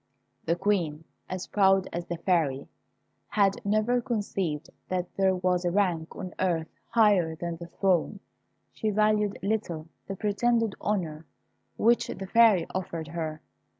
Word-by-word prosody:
The 165 Hz, -, +2 dB
Queen, 170 Hz, -5 st, 0 dB, 0.3 s
as 185 Hz, 0 st, -4 dB
proud 195 Hz, -2 st, +3 dB
as 170 Hz, 0 st, -4 dB
the 175 Hz, -, -3 dB
Fairy, 160 Hz, -7 st, 0 dB, 0.6 s
had 200 Hz, -2 st, +1 dB
never 215 Hz, +4 st, +2 dB
conceived 200 Hz, -, -2 dB, 0.2 s
that 180 Hz, -1 st, -3 dB
there 190 Hz, -1 st, +3 dB
was 180 Hz, 0 st, +1 dB
a 175 Hz, -, +1 dB
rank 175 Hz, -4 st, 0 dB
on 185 Hz, -2 st, -6 dB
earth 165 Hz, -4 st, 0 dB, 0.2 s
higher 205 Hz, -8 st, +4 dB
than 170 Hz, 0 st, -4 dB
the 170 Hz, 0 st, -8 dB
throne. 190 Hz, +1 st, +1 dB, 0.5 s
She 220 Hz, -, -1 dB
valued 210 Hz, -1 st, +2 dB
little 175 Hz, -7 st, -2 dB, 0.2 s
the 195 Hz, -, -4 dB
pretended 225 Hz, +2 st, +1 dB
honour 165 Hz, -7 st, -2 dB, 0.5 s
which 235 Hz, +2 st, +3 dB
the 195 Hz, -, -5 dB
Fairy 215 Hz, -4 st, +5 dB
offered 165 Hz, -4 st, -4 dB
her. 160 Hz, -2 st, -4 dB
185 Hz, 140 wpm, -28 LUFS, 170-210 Hz, 0.6 s, Fairy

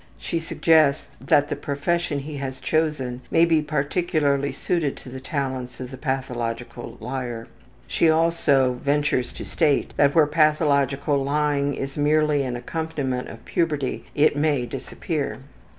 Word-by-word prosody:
She 165 Hz, -, -2 dB
suggests 155 Hz, -3 st, +3 dB, 0.2 s
that 145 Hz, 0 st, +3 dB
the -, -, -1 dB
profession 145 Hz, +3 st, -1 dB
he 145 Hz, +1 st, -6 dB
has 130 Hz, -1 st, -5 dB
chosen 150 Hz, -6 st, -1 dB
may 165 Hz, -, +5 dB
be 165 Hz, -2 st, +3 dB
particularly 150 Hz, -1 st, 0 dB
suited 150 Hz, +1 st, -1 dB
to -, -, -11 dB
the 130 Hz, +1 st, -7 dB
talents 130 Hz, -2 st, -4 dB
of 125 Hz, 0 st, -6 dB
the 130 Hz, -, -7 dB
pathological 120 Hz, -3 st, -4 dB
liar. 120 Hz, -1 st, -5 dB, 0.4 s
She 165 Hz, -, +2 dB
also 150 Hz, -6 st, +3 dB
ventures 140 Hz, -3 st, +1 dB
to -, -, -7 dB
state 150 Hz, -5 st, +1 dB
that 140 Hz, -1 st, +4 dB
where 160 Hz, -2 st, +6 dB
pathological 145 Hz, -2 st, +2 dB
lying 145 Hz, 0 st, +1 dB
is 135 Hz, +1 st, -5 dB
merely 150 Hz, 0 st, +3 dB
an 125 Hz, -3 st, -2 dB
accompaniment 135 Hz, -2 st, -3 dB
of 115 Hz, 0 st, -11 dB
puberty 150 Hz, -6 st, -1 dB
it 150 Hz, 0 st, +4 dB
may 145 Hz, -4 st, +1 dB
disappear. 140 Hz, +4 st, -4 dB
145 Hz, 140 wpm, -24 LUFS, 130-155 Hz, 0.4 s, where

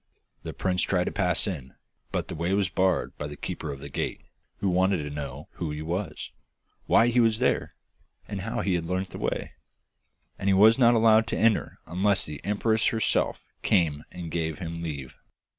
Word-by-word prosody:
The -, -, -6 dB
prince 90 Hz, -1 st, 0 dB
tried 90 Hz, -2 st, +2 dB
to -, -, -2 dB
pass 90 Hz, -3 st, +1 dB
in, 75 Hz, -10 st, -5 dB, 0.4 s
but -, -, -2 dB
the -, -, -5 dB
way 85 Hz, +4 st, 0 dB
was 100 Hz, -3 st, +1 dB
barred 95 Hz, -1 st, +1 dB
by 75 Hz, -, -3 dB
the 75 Hz, -, -8 dB
keeper 80 Hz, -, -5 dB
of 70 Hz, -1 st, -8 dB
the 70 Hz, -, -7 dB
gate, 70 Hz, -, -3 dB, 0.4 s
who 100 Hz, -, -1 dB
wanted 95 Hz, +1 st, +3 dB
to 75 Hz, -, -5 dB
know 75 Hz, 0 st, -6 dB
who 85 Hz, -, -4 dB
he 75 Hz, +1 st, -4 dB
was, 85 Hz, -1 st, -4 dB, 0.6 s
why 115 Hz, -, +5 dB
he 120 Hz, +1 st, +2 dB
was 115 Hz, -2 st, +4 dB
there, 125 Hz, +2 st, 0 dB, 0.5 s
and 100 Hz, -2 st, -4 dB
how 115 Hz, +4 st, -2 dB
he 95 Hz, -, 0 dB
had 85 Hz, -2 st, -1 dB
learnt 95 Hz, +2 st, -2 dB
the -, -, -7 dB
way, -, -, -2 dB, 0.9 s
and 100 Hz, -, 0 dB
he 95 Hz, -, +5 dB
was 110 Hz, +5 st, +6 dB
not 120 Hz, -1 st, +6 dB
allowed 110 Hz, 0 st, +5 dB
to -, -, -2 dB
enter 110 Hz, -1 st, +2 dB
unless 95 Hz, +4 st, +1 dB
the 75 Hz, -2 st, -8 dB
empress 110 Hz, +2 st, +1 dB
herself 110 Hz, -1 st, +1 dB, 0.2 s
came 80 Hz, -8 st, +2 dB
and 85 Hz, -3 st, -7 dB
gave 80 Hz, -2 st, -2 dB
him 85 Hz, -2 st, -5 dB
leave. 70 Hz, -6 st, -5 dB
90 Hz, 195 wpm, -27 LUFS, 80-105 Hz, 0.9 s, was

